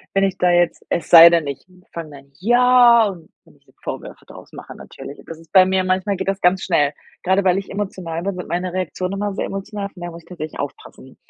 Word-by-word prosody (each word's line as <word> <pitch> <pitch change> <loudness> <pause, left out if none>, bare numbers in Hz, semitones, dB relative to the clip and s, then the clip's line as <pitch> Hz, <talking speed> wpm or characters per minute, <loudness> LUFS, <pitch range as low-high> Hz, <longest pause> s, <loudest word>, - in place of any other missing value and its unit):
wenn 195 0 +2
ich 195 -1 -1
da 180 - +2
jetzt 175 -1 +1
es 170 - -3
sei 170 0 +10
denn, 170 -3 +1
ich 140 -1 -6 0.3
fange 165 -2 -7
dann 140 -1 -15
ja, 240 +1 +5
und 175 -5 -7 0.2
wenn - - -23
ich - - -32
ihr - - -26
Vorwürfe - - -8
draus - - -14
mache - - -11
natürlich. 140 - -11
Das 165 - -10
ist 165 -1 -20
bei 190 -1 +7
mir 190 0 0
manchmal 185 +2 -1
geht 190 - -5
das 195 0 -2
ganz 185 +2 +2
schnell. 145 -5 +1 0.3
Grade 190 +2 +1
weil 185 0 +3
ich 195 - -7
emotional 185 -5 -5
bin, 200 0 -2
sind 180 - -8
meine 175 +2 -3
Reaktionen 185 +1 -4
immer 205 0 -3
sehr - - -2
emotional, 200 +1 -6
von 190 - -16
daher 175 0 -6
muss 170 0 -12
ich - - -23
tatsächlich 155 -4 -8
aufpassen, 135 -2 -9
185 Hz, 240 wpm, -19 LUFS, 165-195 Hz, 0.3 s, sei